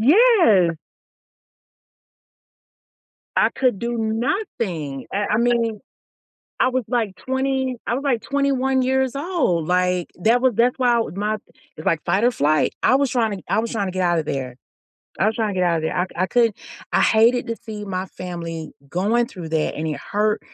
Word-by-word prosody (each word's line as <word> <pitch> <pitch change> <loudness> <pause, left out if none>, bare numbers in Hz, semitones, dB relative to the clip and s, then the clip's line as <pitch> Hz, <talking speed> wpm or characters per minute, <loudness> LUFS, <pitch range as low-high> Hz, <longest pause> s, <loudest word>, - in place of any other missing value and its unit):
Yes! 250 - +5 2.6
I - - +4
could 255 -7 +1
do 235 0 -2
nothing. 220 - -2
I 205 +1 0
I - - +3
mean. 235 -2 +1 0.8
I 255 - +4
was 255 0 0
like 225 -6 0
twenty 265 +1 -1
I - - 0
was 265 - -3
like 260 -6 +1
21 270 -2 +1
years 265 0 +1
old, 275 - 0
like, 180 -1 +1
that 235 +3 +4
was 255 -3 +3
that's 245 +2 +3
why 245 -2 +3
my 210 +2 -1 0.4
it's 155 - -10
like 165 -2 +1
fight 190 +6 +1
or 245 - +4
flight. 150 -6 +1
I 260 - +5
was 275 -2 +1
trying 225 -4 0
to - - -13
I 210 - +2
was 230 0 -4
trying 210 -4 -1
to 185 - -4
get 185 - -1
outta 175 -3 +1
there. 130 -4 -4 0.6
I - - +3
was 220 - +1
trying 220 -2 -1
to 185 - -1
get 180 - +3
outta 165 -2 0
there. 160 - -2
I 180 - +1
c - - -11
I 185 +2 +1
couldn't 230 -1 +2 0.3
I - - +3
hated 230 +3 +3
to 230 - -2
see 215 -2 -8
my 190 -1 -3
family 170 -4 -6 0.2
going 210 +9 +1
through 180 -9 -9
that, 160 -1 0
and 160 +1 -3
it 150 - -4
hurt 210 +1 0
220 Hz, 185 wpm, -22 LUFS, 180-250 Hz, 2.6 s, Yes